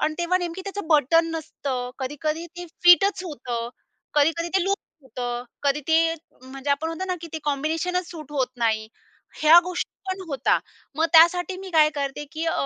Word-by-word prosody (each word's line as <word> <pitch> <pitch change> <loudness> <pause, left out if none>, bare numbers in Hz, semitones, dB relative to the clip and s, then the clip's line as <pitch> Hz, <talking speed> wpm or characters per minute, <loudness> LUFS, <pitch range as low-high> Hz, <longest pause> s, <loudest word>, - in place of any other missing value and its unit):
आणि 310 0 0
तेव्हा 345 +1 +1
नेमकी 350 0 -4
त्याचं 400 -2 -5
बटन 330 +2 +4
नसतं, 275 -6 -4
कधी-कधी 305 +5 -3
ते 355 - -6 0.2
फिटच 370 +2 +6
होतं, 245 -7 -4 0.5
कधी-कधी 330 +3 +2
ते 375 - +2
लुझ 395 - +2 0.3
होतं, 245 -2 -5 0.2
कधी 280 +1 +1
ते 325 0 +3 0.3
म्हणजे 270 +2 -6
आपण 290 +3 0
म्हणतो 330 +3 -4
ना, 365 - -1
की 335 - -7
ते 320 - -3
कॉम्बिनेशनच 320 +5 -1
सूट 305 -4 -10
होत 270 -3 +1
नाही. 220 -2 0 0.5
ह्या 315 +3 +9
गोष्टी 360 0 -3 0.2
पण 375 +1 -4
होता. 275 - +1 0.4
मग 320 +1 +2
त्यासाठी 355 +3 +5
मी 380 0 -8
काय 305 -2 +5
करते 280 +1 -3
की 320 +1 -3
अ, 325 - +1
320 Hz, 175 wpm, -24 LUFS, 280-345 Hz, 0.5 s, ह्या